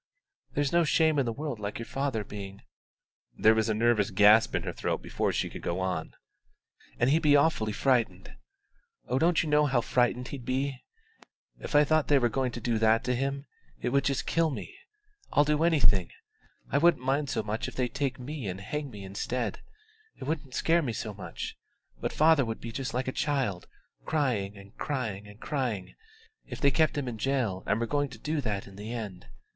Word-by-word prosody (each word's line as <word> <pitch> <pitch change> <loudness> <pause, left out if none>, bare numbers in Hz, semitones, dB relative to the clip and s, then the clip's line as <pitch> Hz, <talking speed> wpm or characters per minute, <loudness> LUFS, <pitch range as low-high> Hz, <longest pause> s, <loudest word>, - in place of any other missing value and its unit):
There's 145 -1 +1
no 170 0 +5
shame 160 -1 +3
in 130 - +1
the - - 0
world 140 -1 -4
like 105 0 -4
your 115 - -5
father 135 -4 -2
being 100 -1 -8 0.4
" - - -41
(there 110 - +6
was 110 0 +1
a 110 - +1
nervous 115 -2 +3
gasp 105 +3 +5
in - - 0
her - - -4
throat - - -2
before - - -1
she - - -1
could - - -8
go 85 +2 -2
on) 90 -4 -3 0.8
"and 120 +3 +3
he'd 160 +2 +3
be 145 -2 +5
awfully 140 -7 +3
frightened. 110 - 0 0.7
Oh, 120 - -4
you 130 - +3
don't 170 +2 +3
know 150 -1 +3
how 135 -3 +2
frightened 125 +1 +1
he'd 135 -3 -7
be! 130 +1 -2 0.8
If - - -5
I 145 - +8
thought 155 +1 +2
they 145 - +5
were 120 -3 +3
going 130 +1 -1
to - - -5
do 115 -1 0
that 110 +1 +4
to 125 0 0
him, 135 +2 -2 0.3
it - - -1
would 140 +2 +2
just 140 -1 0
kill 165 -1 +2
me. 155 - -6 0.6
I'll 145 - +6
do 150 +1 +2
anything; 105 - +3 0.6
I 140 - +3
wouldn't 170 -4 +4
mind 140 +2 +1
so - - -1
much 105 +2 -3
if - - -8
they'd 125 -2 -1
take 135 -3 -1
me 130 -2 -5
and 95 0 -4
hang 145 +8 -4
me 105 -5 -9
instead 105 +3 -3 0.6
it - - -8
wouldn't 140 -2 -3
scare 170 +1 +3
me 125 -7 -2
so 110 0 -4
much: 90 -4 -6 0.4
but - - -2
father 155 -2 +5
would 115 -2 -4
be 115 - -6
just 125 -1 -4
like 125 +1 -1
a - - 0
child, 130 - -1 0.4
crying 115 -10 0
and 100 +1 -14
crying 110 -8 -3
and 105 +1 -14
crying, 125 -10 -3 0.5
if - - -7
they 140 - +4
kept 155 +1 +2
him 140 -3 -2
in 115 -3 -5
jail 120 -8 0
and 105 - +2
were 115 - 0
going 145 +3 0
to 125 - -11
do 150 +5 -2
that 105 -5 -2
in 100 0 -13
the 105 +3 -6
end. 105 - -6
125 Hz, 210 wpm, -29 LUFS, 105-145 Hz, 0.8 s, I